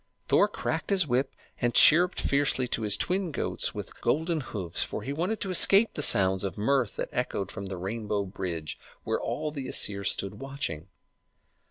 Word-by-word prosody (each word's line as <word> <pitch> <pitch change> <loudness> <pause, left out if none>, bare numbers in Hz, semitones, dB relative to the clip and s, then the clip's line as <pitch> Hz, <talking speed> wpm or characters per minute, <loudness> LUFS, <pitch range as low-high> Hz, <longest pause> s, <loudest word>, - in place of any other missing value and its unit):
Thor - - +4
cracked - - -4
his 195 -4 +3
whip 130 0 -1 0.3
and 120 -1 0
chirruped 175 +4 +6
fiercely 140 -2 +1
to 115 - -1
his 105 -2 +1
twin 185 -1 -1
goats - - -2
with - - -9
golden 160 +1 0
hoofs, 95 -9 -4
for - - -3
he 140 - -4
wanted 185 +8 -2
to 195 - -3
escape 195 +4 +4
the - - -4
sounds 95 -7 +6
of 95 -3 -4
mirth 125 +1 0
that - - -4
echoed 125 -5 -3
from 100 -2 -7
the 95 -1 -6
rainbow 105 +2 -3
bridge, 90 -5 -5 0.2
where - - -2
all 150 - -3
the 140 -3 -6
Æsir 100 -1 +1
stood 100 +1 -1
watching. 135 - -6
125 Hz, 180 wpm, -27 LUFS, 100-155 Hz, 0.3 s, chirruped